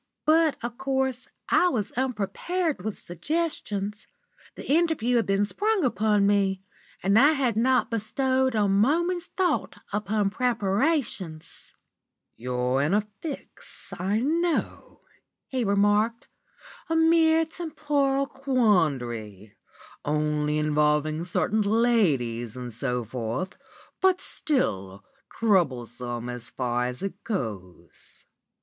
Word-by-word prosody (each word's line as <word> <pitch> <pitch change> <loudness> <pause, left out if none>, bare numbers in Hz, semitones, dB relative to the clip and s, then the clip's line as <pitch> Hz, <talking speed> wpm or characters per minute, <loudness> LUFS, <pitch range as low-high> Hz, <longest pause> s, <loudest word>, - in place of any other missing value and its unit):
"But, 315 -1 +4
of 240 +1 -5
course, 265 -2 -1 0.2
I 360 - +4
was 220 - -1
unprepared 265 - -2
with 215 -1 -4
suggestions. 210 - -3 0.5
The - - -9
interview 295 -6 +2
had 230 - +1
been 195 +1 +2
sprung 415 - 0
upon 210 -3 +2
me, 195 -2 +1 0.4
and 200 +3 +4
I 290 +5 +6
had 260 -6 0
not 250 +3 +2
bestowed 260 +3 0
a 210 -2 +3
moment's 325 - +2
thought 370 -2 -1 0.2
upon 210 0 0
preparations. 210 - -1 0.6
"'You're 125 +2 -1
in 155 +7 +2
a 210 - +3 0.2
fix, 305 -4 -8
I 195 +4 0
know,' 330 +5 -1 0.5
he 260 -2 -1
remarked, 205 +3 +2 0.6
'a 325 - +1
mere 325 0 +4
temporal 295 -4 -1
quandary, 140 - 0 0.5
only 150 0 0
involving 150 +1 +1
certain 190 +4 0
ladies 170 - +1
and 125 -2 -6
so 125 +2 -2
forth, 115 - -4 0.5
but 375 -1 +4
still 100 - -2 0.3
troublesome 125 - 0
so 115 0 -12
far 125 -1 0
as 125 +7 -6
it 195 -1 -5
goes. 95 - -6
210 Hz, 110 wpm, -26 LUFS, -, 0.6 s, I